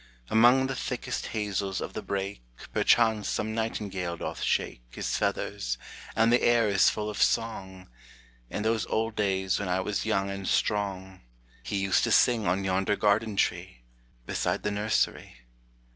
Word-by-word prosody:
Among 120 Hz, +4 st, +6 dB
the 135 Hz, -, -2 dB
thickest 125 Hz, -1 st, -3 dB
hazels 100 Hz, -3 st, -2 dB
of -, -, -5 dB
the -, -, -4 dB
brake 100 Hz, -4 st, -4 dB, 0.3 s
Perchance 110 Hz, -3 st, +3 dB
some 110 Hz, 0 st, -2 dB
nightingale 100 Hz, -6 st, -3 dB
doth -, -, -5 dB
shake -, -, 0 dB
His -, -, -3 dB
feathers, -, -, -1 dB, 0.4 s
and 115 Hz, +1 st, +4 dB
the 120 Hz, -, +4 dB
air 120 Hz, -2 st, +4 dB
is 100 Hz, -2 st, +4 dB
full 105 Hz, -1 st, -3 dB
of 105 Hz, -, -4 dB
song; 95 Hz, -5 st, 0 dB, 0.6 s
In 105 Hz, -, -3 dB
those 110 Hz, 0 st, 0 dB
old 115 Hz, 0 st, -1 dB
days 95 Hz, -2 st, 0 dB
when 100 Hz, -2 st, -3 dB
I 90 Hz, +1 st, +1 dB
was 100 Hz, +2 st, -2 dB
young 100 Hz, -3 st, 0 dB
and 100 Hz, -1 st, -5 dB
strong, 95 Hz, -2 st, -1 dB, 0.4 s
He 100 Hz, -, -3 dB
used 95 Hz, -1 st, +2 dB
to -, -, -1 dB
sing 115 Hz, -5 st, +4 dB
on 95 Hz, +3 st, +1 dB
yonder 95 Hz, +2 st, +1 dB
garden 105 Hz, +1 st, +1 dB
tree, -, -, -1 dB, 0.4 s
Beside -, -, -1 dB
the 105 Hz, -, 0 dB
nursery. 105 Hz, +1 st, -1 dB
100 Hz, 160 wpm, -28 LUFS, 95-110 Hz, 0.6 s, Among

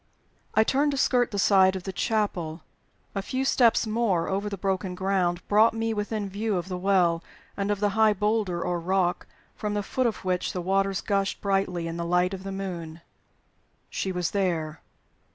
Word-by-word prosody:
I 220 Hz, -, +6 dB
turned 280 Hz, +6 st, +2 dB
to -, -, -2 dB
skirt 250 Hz, -2 st, +2 dB
the 205 Hz, -, -4 dB
side 190 Hz, -1 st, +5 dB
of 185 Hz, -, -5 dB
the 190 Hz, -, -5 dB
chapel. 180 Hz, -7 st, -1 dB, 0.5 s
A 195 Hz, -, -2 dB
few 260 Hz, +6 st, -2 dB
steps 240 Hz, -3 st, +4 dB
more 215 Hz, -6 st, +1 dB
over 200 Hz, +2 st, -1 dB
the 200 Hz, -, -5 dB
broken 190 Hz, -1 st, -2 dB
ground 180 Hz, -2 st, 0 dB
brought 220 Hz, +2 st, +4 dB
me 225 Hz, 0 st, -1 dB
within 210 Hz, 0 st, -2 dB
view 205 Hz, +1 st, -1 dB
of 175 Hz, +2 st, -4 dB
the 180 Hz, -, -3 dB
Well, 180 Hz, -3 st, +2 dB, 0.3 s
and 200 Hz, 0 st, -2 dB
of 205 Hz, -1 st, 0 dB
the 205 Hz, 0 st, +2 dB
high 220 Hz, +1 st, +4 dB
boulder 210 Hz, -3 st, 0 dB
or 175 Hz, -1 st, -1 dB
rock 180 Hz, +1 st, 0 dB, 0.3 s
from 210 Hz, -1 st, -3 dB
the 205 Hz, -, -1 dB
foot 255 Hz, +5 st, 0 dB
of 220 Hz, -, -4 dB
which 180 Hz, -1 st, -1 dB
the 180 Hz, -, -3 dB
waters 195 Hz, +1 st, +1 dB
gushed 200 Hz, -2 st, -1 dB
brightly 195 Hz, -4 st, 0 dB
in 165 Hz, 0 st, -4 dB
the 170 Hz, -, -2 dB
light 180 Hz, +2 st, +2 dB
of 190 Hz, -, -5 dB
the 195 Hz, 0 st, -6 dB
moon. 170 Hz, -4 st, -6 dB, 0.9 s
She 190 Hz, -, -2 dB
was 180 Hz, -2 st, -1 dB
there. 165 Hz, -6 st, -1 dB
195 Hz, 190 wpm, -26 LUFS, 180-210 Hz, 0.9 s, I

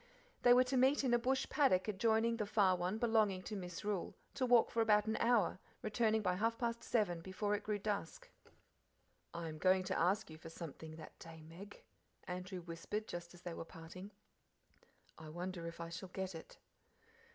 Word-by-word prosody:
They 245 Hz, -, +6 dB
were 250 Hz, +1 st, +8 dB
to 255 Hz, +1 st, -1 dB
meet 265 Hz, +3 st, +4 dB
in 250 Hz, -3 st, +2 dB
a 240 Hz, -, +5 dB
bush 260 Hz, +2 st, +1 dB
paddock 220 Hz, -11 st, +3 dB
adjoining 225 Hz, +3 st, +2 dB
the 210 Hz, -2 st, -2 dB
far 195 Hz, -3 st, +4 dB
one 180 Hz, +4 st, -1 dB
belonging 220 Hz, -5 st, +2 dB
to 210 Hz, -, -5 dB
Misrule, 185 Hz, +1 st, -3 dB, 0.2 s
to 260 Hz, -2 st, 0 dB
walk 240 Hz, -2 st, +5 dB
for 230 Hz, -, +1 dB
about 210 Hz, -2 st, +4 dB
an 220 Hz, 0 st, 0 dB
hour, 230 Hz, -6 st, +2 dB, 0.2 s
returning 220 Hz, 0 st, +1 dB
by 180 Hz, -2 st, +1 dB
half 230 Hz, +3 st, +1 dB
past 235 Hz, -1 st, -2 dB
seven, 185 Hz, -8 st, +1 dB
before 190 Hz, +3 st, -2 dB
it 205 Hz, -, 0 dB
grew 210 Hz, -1 st, -1 dB
dusk. 200 Hz, -4 st, -3 dB, 1.0 s
"I 170 Hz, 0 st, -5 dB
am 155 Hz, -1 st, -7 dB
going 185 Hz, +1 st, +4 dB
to -, -, -1 dB
ask 180 Hz, 0 st, +1 dB
you 155 Hz, -, -10 dB
for 165 Hz, -, -9 dB
something 160 Hz, -1 st, -8 dB
that 160 Hz, -1 st, -12 dB
day, 160 Hz, -2 st, -11 dB
Meg," 180 Hz, +6 st, -11 dB, 0.4 s
Andrew 180 Hz, +1 st, -5 dB
whispered 170 Hz, +6 st, -5 dB
just 175 Hz, 0 st, -7 dB
as 175 Hz, -, -16 dB
they 175 Hz, -, -4 dB
were -, -, -5 dB
parting. 165 Hz, +4 st, -10 dB, 1.1 s
"I 160 Hz, -1 st, -9 dB
wonder 175 Hz, +1 st, -5 dB
if 170 Hz, 0 st, -8 dB
I 170 Hz, 0 st, -5 dB
shall 175 Hz, +3 st, -7 dB
get 190 Hz, 0 st, -4 dB
it." 165 Hz, -, -10 dB
190 Hz, 190 wpm, -37 LUFS, 170-220 Hz, 1.1 s, were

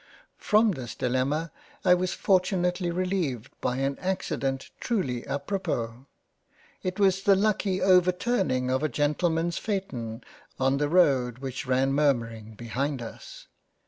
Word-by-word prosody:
From 215 Hz, +1 st, +4 dB
this 130 Hz, -9 st, -6 dB
Dilemma 135 Hz, +6 st, 0 dB, 0.3 s
I 180 Hz, -, +7 dB
was 180 Hz, +1 st, +1 dB
most -, -, -3 dB
fortunately 180 Hz, -1 st, +2 dB
releived 175 Hz, -, -2 dB
by 125 Hz, -, 0 dB
an 135 Hz, +1 st, -1 dB
accident 135 Hz, -8 st, -2 dB
truly 135 Hz, -, -2 dB
apropos; 140 Hz, -, -3 dB, 0.7 s
it 185 Hz, +2 st, -3 dB
was 195 Hz, -1 st, +3 dB
the 195 Hz, 0 st, +5 dB
lucky 195 Hz, -1 st, +1 dB
overturning 180 Hz, -, +2 dB
of 130 Hz, +1 st, +1 dB
a 155 Hz, -, 0 dB
Gentleman's 165 Hz, +5 st, 0 dB
Phaeton, 130 Hz, -, -4 dB, 0.4 s
on 135 Hz, +1 st, +2 dB
the 145 Hz, 0 st, +1 dB
road 135 Hz, -9 st, +3 dB
which 130 Hz, +1 st, -5 dB
ran 130 Hz, +1 st, +2 dB
murmuring 115 Hz, -7 st, 0 dB
behind 130 Hz, +5 st, -2 dB
us. 115 Hz, -1 st, -9 dB
145 Hz, 130 wpm, -27 LUFS, 130-185 Hz, 0.7 s, I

